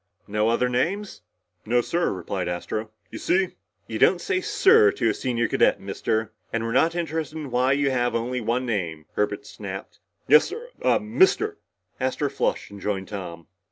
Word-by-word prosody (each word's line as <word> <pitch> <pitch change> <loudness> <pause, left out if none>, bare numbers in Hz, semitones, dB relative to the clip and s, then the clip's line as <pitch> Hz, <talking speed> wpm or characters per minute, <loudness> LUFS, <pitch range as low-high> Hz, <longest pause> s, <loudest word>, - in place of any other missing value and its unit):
"No 105 +2 +1
other 120 +2 +2
names?" 175 - -1 0.4
"No, 120 +3 +2
sir," 170 +8 0
replied 90 0 -3
Astro. 105 +5 -3 0.2
"You - - -6
see 185 0 +2 0.2
" - - -47
"You - - -4
don't - - +5
say 375 -2 -1
'sir' 425 +1 +5
to 410 - +1
a - - +1
senior 120 -3 -1
cadet, - - +3
Mister. 110 0 -2 0.2
And 115 0 -1
we're 115 - -2
not 165 +7 +3
interested 160 -2 -3
in 145 -4 -6
why 125 +2 +3
you 140 -1 +1
have 120 -2 0
only 120 +2 -1
one 120 +3 0
name!" 85 -9 -2
Herbert 105 0 -1
snapped. - - -8 0.3
"Yes, 150 +2 +7
sir 470 +5 -7
uhh - - +4
Mister." 380 - +2 0.4
Astro - - -1
flushed - - -1
and 100 -1 -10
joined 95 -2 -2
Tom. 85 -5 -7
125 Hz, 180 wpm, -25 LUFS, 105-175 Hz, 0.4 s, Yes